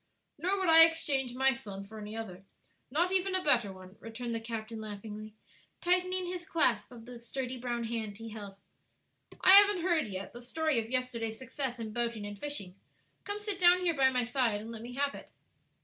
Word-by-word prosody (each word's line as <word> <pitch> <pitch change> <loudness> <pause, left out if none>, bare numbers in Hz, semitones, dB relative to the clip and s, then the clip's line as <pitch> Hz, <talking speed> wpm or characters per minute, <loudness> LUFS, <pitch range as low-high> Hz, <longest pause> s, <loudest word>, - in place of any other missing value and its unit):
"Nor 370 +5 +1
would 380 -2 -1
I 325 0 +10
exchange 280 -6 +1
my 265 +1 +4
son 200 -7 -8
for 215 +2 -11
any 210 +1 -7
other; 190 -4 -7 0.5
not 340 +7 +1
even 380 0 +2
a 370 - 0
better 240 - +3
one," 185 +1 -13
returned 230 +1 -6
the 230 - -2
captain 225 -1 -6
laughingly, 215 0 -8 0.4
tightening 365 +1 +1
his 355 0 -5
clasp 255 - +1
of 230 -2 -12
the 245 -1 -10
sturdy 250 +1 -5
brown 240 -1 -3
hand 225 -3 -4
he 225 0 -8
held. 205 -3 -9 0.9
"I 370 - +6
haven't 400 -2 +8
heard 340 -7 +1
yet 195 -1 -7
the 240 - -10
story 310 +2 -1
of 225 0 -5
yesterday's 235 -3 -2
success 260 0 -5
in 220 -2 -6
boating 235 -3 -2
and 205 -1 -8
fishing; 245 -11 -4 0.5
come 410 0 -4
sit 415 -2 -2
down 360 0 +6
here 350 -2 +1
by 270 -3 +4
my 250 -1 0
side 235 -3 0
and 220 +2 -8
let 225 -1 -8
me 240 +2 -8
have 280 +1 0
it." - - -11
245 Hz, 200 wpm, -31 LUFS, 220-320 Hz, 0.9 s, I